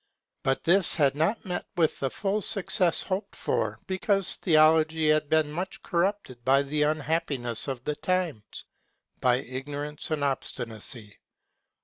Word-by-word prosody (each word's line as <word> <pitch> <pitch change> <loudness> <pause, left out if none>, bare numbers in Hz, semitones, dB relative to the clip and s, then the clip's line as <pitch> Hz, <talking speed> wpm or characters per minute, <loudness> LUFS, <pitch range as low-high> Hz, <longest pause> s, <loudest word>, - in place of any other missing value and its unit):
But 135 0 0
this 175 +3 +4
had 140 -3 +3
not 165 +11 0
met 180 -1 -4
with 160 -3 +2
the 135 - 0
full 200 +7 -1
success 185 -4 +1
hoped 190 +2 -3
for, - - -1
because 190 0 0
theology 155 -1 +4
had 155 -1 +2
been 155 -1 +2
much 180 +5 -5
corrupted 175 - -1
by 135 +3 +4
the 150 +2 -1
unhappiness 150 -6 -1
of 130 -3 -4
the 150 - -2
times, 175 - -2 0.5
by 125 -1 +3
ignorance 145 +3 -5
and 155 -2 -1
obstinacy. 115 -5 -3
155 Hz, 135 wpm, -27 LUFS, 135-180 Hz, 0.5 s, this